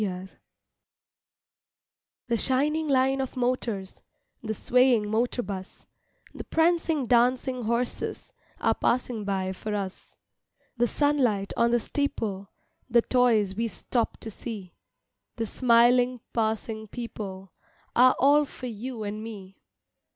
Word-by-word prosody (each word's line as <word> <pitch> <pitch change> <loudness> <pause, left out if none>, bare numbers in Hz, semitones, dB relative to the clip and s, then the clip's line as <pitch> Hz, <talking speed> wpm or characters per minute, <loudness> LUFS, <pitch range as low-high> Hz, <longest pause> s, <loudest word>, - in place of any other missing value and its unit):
MAY 210 - +1 0.2
DAY - - -14 2.0
THE 235 - +2
shining 295 +6 +1
line 270 -1 +2
of 265 -1 -5
motors, 240 -6 -2 0.4
The 220 -1 -3
swaying 250 -2 +3
motor 240 +2 0
bus, 190 -1 -7 0.5
The - - -7
prancing 325 -3 +1
dancing 250 +1 +2
horses 235 +2 -2 0.3
Are - - +2
passing 240 -3 -1
by 190 -1 -1
for 210 +3 -4
us. 195 -2 -6 0.6
The 240 0 +2
sunlight 250 -9 +1
on 235 0 +3
the 240 0 +3
steeple, 210 -7 -2 0.4
The 235 -1 +4
toys 230 -6 +3
we 230 +2 0
stop 230 +1 -2
to 225 - -6
see, 205 -4 -7 0.6
The 230 - -2
smiling 245 +1 +4
passing 220 -1 -1
people 195 -5 -7 0.4
Are 255 +1 +6
all 290 +2 +5
for 260 - -10
you 235 0 -5
and 210 +1 -4
me. 195 -4 -10
235 Hz, 120 wpm, -27 LUFS, 210-255 Hz, 2.0 s, Are